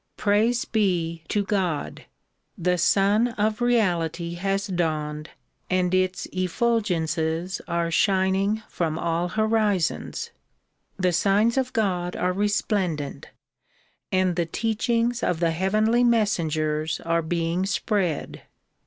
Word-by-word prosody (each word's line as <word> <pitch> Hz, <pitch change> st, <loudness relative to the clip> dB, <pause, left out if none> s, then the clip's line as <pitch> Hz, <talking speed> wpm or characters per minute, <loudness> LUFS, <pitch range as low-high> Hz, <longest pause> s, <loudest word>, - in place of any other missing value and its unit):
Praise 220 Hz, +4 st, +2 dB
be 175 Hz, -7 st, 0 dB
to 205 Hz, +4 st, 0 dB
God! 185 Hz, -7 st, -2 dB, 0.5 s
the 180 Hz, +1 st, 0 dB
Sun 200 Hz, +6 st, +3 dB
of 215 Hz, +2 st, 0 dB
Reality 175 Hz, -8 st, +1 dB
has 195 Hz, +3 st, -1 dB
dawned 155 Hz, -5 st, -2 dB, 0.4 s
and 185 Hz, -1 st, +1 dB
its 185 Hz, 0 st, +1 dB
efful 225 Hz, +6 st, +1 dB
gences 165 Hz, -1 st, -2 dB
are 170 Hz, 0 st, -1 dB
shining 195 Hz, +3 st, +2 dB
from 160 Hz, -2 st, -2 dB
all 170 Hz, +1 st, -1 dB
horizons. 215 Hz, -3 st, 0 dB, 0.7 s
The 185 Hz, -2 st, +1 dB
signs 205 Hz, +6 st, +3 dB
of 260 Hz, -1 st, 0 dB
God 180 Hz, -6 st, -1 dB
are 180 Hz, 0 st, 0 dB
resplendent 195 Hz, -6 st, -1 dB, 0.8 s
and 185 Hz, -2 st, +2 dB
the 170 Hz, -1 st, 0 dB
teachings 230 Hz, +4 st, 0 dB
of 175 Hz, -2 st, 0 dB
the 170 Hz, -1 st, +2 dB
heavenly 215 Hz, +7 st, +2 dB
messengers 160 Hz, -9 st, +1 dB
are 165 Hz, 0 st, +1 dB
being 170 Hz, +3 st, -1 dB
spread. 195 Hz, -6 st, -1 dB
185 Hz, 110 wpm, -24 LUFS, 170-210 Hz, 0.8 s, Sun